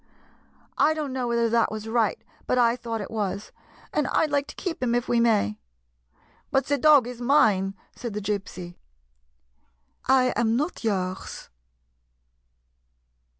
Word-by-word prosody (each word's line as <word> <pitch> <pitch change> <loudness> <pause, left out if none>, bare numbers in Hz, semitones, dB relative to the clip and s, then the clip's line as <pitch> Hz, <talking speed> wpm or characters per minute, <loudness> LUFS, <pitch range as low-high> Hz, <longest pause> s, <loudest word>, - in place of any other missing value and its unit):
I 315 +1 +4
don't 295 -4 -3
know 255 -2 -2
whether 235 -1 +2
that 230 0 +2
was 215 0 -6
right, 225 -1 +1 0.3
but 250 - +1
I 235 -1 +4
thought 230 -3 -4
it 200 - -7
was. 205 -2 -3 0.4
And 295 -3 +1
I - - +2
'd 305 - -6
like 285 0 +1
to - - -10
keep 345 -7 -4
him 240 -2 +1
if 245 - -1
we 240 - +2
may." 215 - +2 0.5
" - - -36
But 270 - +2
the 285 0 0
dog 295 -3 +6
is 245 0 -7
mine," 210 -8 +3 0.2
said 235 -4 -6
the - - -1
Gypsy. 195 -4 -5 0.7
" - - -46 0.5
I 255 -1 +4
am 230 -1 +2
not 300 +4 -2
yours." 190 -4 -3
235 Hz, 160 wpm, -25 LUFS, 210-260 Hz, 0.7 s, dog